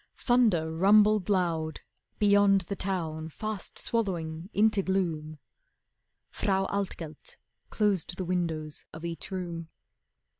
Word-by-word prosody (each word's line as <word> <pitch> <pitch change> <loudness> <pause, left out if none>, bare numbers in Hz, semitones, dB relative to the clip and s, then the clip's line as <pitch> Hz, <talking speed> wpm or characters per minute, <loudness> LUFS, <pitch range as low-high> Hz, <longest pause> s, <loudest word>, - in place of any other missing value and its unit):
Thunder 215 -11 +3
rumbled 210 +4 +4
loud 165 -5 0 0.4
Beyond 205 -1 +5
the 190 +3 -5
town 160 -5 -3
fast 215 +4 -5
swallowing 175 -6 -2
into 210 -1 +3
gloom. 165 -5 -1 0.9
Frau 195 -2 0
Altgelt 175 -6 -5 0.3
closed 195 -5 0
the 185 - -3
windows 165 -4 -2
of 160 +1 -8
each 170 -1 -5
room. 170 -3 -5
185 Hz, 105 wpm, -29 LUFS, 160-200 Hz, 0.9 s, Beyond